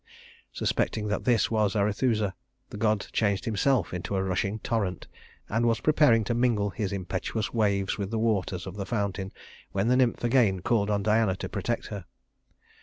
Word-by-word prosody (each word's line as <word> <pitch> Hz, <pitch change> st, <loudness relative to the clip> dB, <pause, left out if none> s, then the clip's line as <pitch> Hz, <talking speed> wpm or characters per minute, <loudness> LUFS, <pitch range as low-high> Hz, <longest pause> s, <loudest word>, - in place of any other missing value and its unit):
Suspecting 105 Hz, -1 st, -1 dB
that 105 Hz, -, -2 dB
this 120 Hz, -3 st, +2 dB
was 110 Hz, -2 st, +1 dB
Arethusa, 105 Hz, 0 st, +1 dB, 0.4 s
the -, -, -6 dB
god 105 Hz, -1 st, +1 dB
changed 100 Hz, -3 st, +1 dB
himself 115 Hz, -2 st, +1 dB
into 90 Hz, +3 st, -3 dB
a 95 Hz, -, +1 dB
rushing 95 Hz, +2 st, -1 dB
torrent, 105 Hz, -4 st, -2 dB, 0.4 s
and 115 Hz, +3 st, +1 dB
was 115 Hz, -1 st, +2 dB
preparing 150 Hz, -7 st, +4 dB
to 120 Hz, -, -1 dB
mingle 115 Hz, -4 st, +1 dB
his 100 Hz, 0 st, -3 dB
impetuous 100 Hz, +3 st, -3 dB
waves 100 Hz, -3 st, +1 dB
with 100 Hz, -1 st, -2 dB
the 115 Hz, -, -2 dB
waters 105 Hz, -5 st, 0 dB
of 95 Hz, +1 st, -7 dB
the 100 Hz, -, -3 dB
fountain, 100 Hz, -4 st, -2 dB, 0.4 s
when 100 Hz, +4 st, +1 dB
the 125 Hz, -, +4 dB
nymph 125 Hz, -2 st, +2 dB
again 115 Hz, -7 st, +3 dB
called 105 Hz, 0 st, +1 dB
on 100 Hz, -1 st, 0 dB
Diana 110 Hz, -2 st, +2 dB
to 95 Hz, -, -5 dB
protect 105 Hz, +4 st, -2 dB
her. 100 Hz, -3 st, -6 dB
105 Hz, 175 wpm, -27 LUFS, 100-115 Hz, 0.4 s, preparing